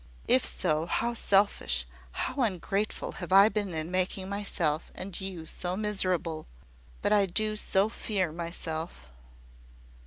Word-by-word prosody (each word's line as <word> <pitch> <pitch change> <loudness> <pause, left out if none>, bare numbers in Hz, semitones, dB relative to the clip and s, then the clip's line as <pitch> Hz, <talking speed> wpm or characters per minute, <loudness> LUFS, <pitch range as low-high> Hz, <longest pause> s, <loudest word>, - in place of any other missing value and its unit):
"If - - +4
so, 150 - 0
how 235 +6 0
selfish, 195 - +2 0.3
how 275 - -3
ungrateful 200 -1 -1
have 175 - -6
I 195 +2 +8
been 205 -4 -2
in 160 +1 -2
making 185 +1 0
myself 175 -6 -1
and 190 0 -5
you 185 -4 -4
so 180 +3 -2
miserable! 185 -6 0 0.6
But - - +3
I 200 -2 +4
do 215 +4 +1
so 200 -1 +2
fear 200 -6 -2
myself!" 165 - -5
185 Hz, 130 wpm, -29 LUFS, 165-205 Hz, 0.6 s, I